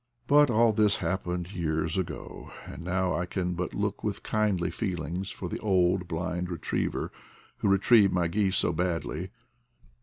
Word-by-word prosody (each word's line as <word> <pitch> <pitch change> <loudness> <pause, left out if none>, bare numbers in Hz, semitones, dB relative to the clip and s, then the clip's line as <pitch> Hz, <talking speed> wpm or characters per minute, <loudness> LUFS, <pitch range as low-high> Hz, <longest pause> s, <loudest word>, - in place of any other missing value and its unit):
But 145 0 +5
all 115 -1 +4
this 105 -1 +4
happened 90 0 -2
years 80 -2 -1
ago, 95 -3 -5
and 85 - -8
now 90 +1 0
I 90 - -2
can 90 -1 -2
but 90 +1 -4
look - - -2
with - - -3
kindly 105 -5 0
feelings 90 -3 -3
for - - -6
the - - -4
old 90 -2 +2
blind 90 +1 -3
re 85 - -3
triever - - -2 0.5
who - - 0
retrieved 100 +1 +5
my 90 -2 +1
geese 95 +2 +1
so 85 - +2
badly. 90 0 -2
90 Hz, 160 wpm, -28 LUFS, 85-100 Hz, 0.5 s, But